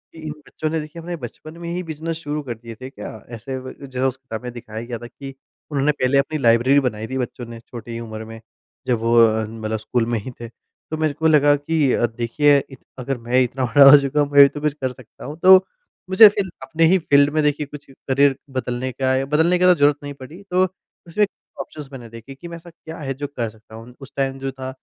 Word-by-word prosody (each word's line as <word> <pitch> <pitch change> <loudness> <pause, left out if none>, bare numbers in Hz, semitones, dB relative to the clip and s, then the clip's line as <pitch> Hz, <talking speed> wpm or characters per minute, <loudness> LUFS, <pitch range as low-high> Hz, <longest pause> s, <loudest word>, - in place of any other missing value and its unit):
इन 155 -1 -6 0.2
बच्चों 155 - -4
ने 160 +1 -1
देखिए 155 +2 -8
अपने 175 +1 -5
बचपन 155 +3 -10
में 170 - -5
ही 180 +1 -3
बिज़नेस 160 0 -5
शुरू 150 -2 -4
कर 125 -4 -4
दिए 115 0 -10
थे 130 - -6
क्या? 105 -6 -8 0.2
ऐसे 125 +3 -6
व 130 0 -8
जो 130 0 -1
उस 130 0 -3
किताब 125 -4 -8
में 125 - -5
दिखाया 110 -2 -8
गया 120 -1 -5
था 120 +1 -9
कि 135 +3 -10 0.4
उन्होंने 145 0 +2
पहले 140 -1 +1
अपनी 140 +3 0
लाइब्रेरी 125 +2 +4
बनाई 110 -5 -3
थी 130 - -4
बच्चों 125 -1 -4
ने 115 0 -10
छोटी 115 0 -8
उम्र 110 -1 -7
में 115 0 -10 0.5
जब 120 -3 +1
वो 115 +1 +1
अ, 110 -1 +4
मतलब 110 0 -4
स्कूल 115 +2 -1
में 120 -1 -1
ही 115 +5 -8
थे। 120 - -5
तो 155 +6 -11
मेरे 155 -2 0
को 160 +3 0
लगा 145 -2 +5
कि 145 -1 0
अ, - - +2
देखिए 120 +6 +2
इत 135 - -13 0.2
अगर 130 +1 -3
मैं 120 +2 +1
इतना 125 +1 -2
बड़ा 135 +4 +7
हो 145 - +10
चुका 140 +1 -1
हूँ 145 - 0
मैं 145 0 +8
भी 140 - +10
तो 145 +1 -8
कुछ 150 -1 0
कर 130 -3 -3
सकता 125 -2 -14
हूँ। 145 +4 -7
तो 190 +1 +10 0.5
मुझे 190 +4 +9
फिर 200 -2 -3
अपने 160 +5 +1
ही 185 +3 +5
फ़ील्ड 145 -4 +4
में 155 - +2
देखिए 150 0 0
कुछ 145 0 -11
करियर 135 +1 +1 0.2
बदलने 125 0 -2
का 130 +1 0
य 135 +1 0
बदलने 160 +5 +2
की 180 - +3
तो 180 - +7
ज़रूरत 145 -2 +3
नहीं 145 0 -6
पड़ी 140 +7 -12
तो 180 +1 +3 0.4
उसमें 190 +5 +1
ही - - -13 0.3
ऑप्शन्स 145 -3 -10
मैंने 125 -4 -10
देखे 115 +4 -11
कि 170 - -10
मैं 170 0 -8
ऐसा 170 +1 -14
क्या 160 -1 -11
है 135 -3 -3
जो 145 +2 -5
कर 120 -5 -4
सकता 110 0 -16
हूँ 115 +2 -11
उस 135 - -11
टाइम 135 -1 -1
जो 135 0 -3
था 130 0 -7
135 Hz, 250 wpm, -21 LUFS, 120-150 Hz, 0.5 s, हो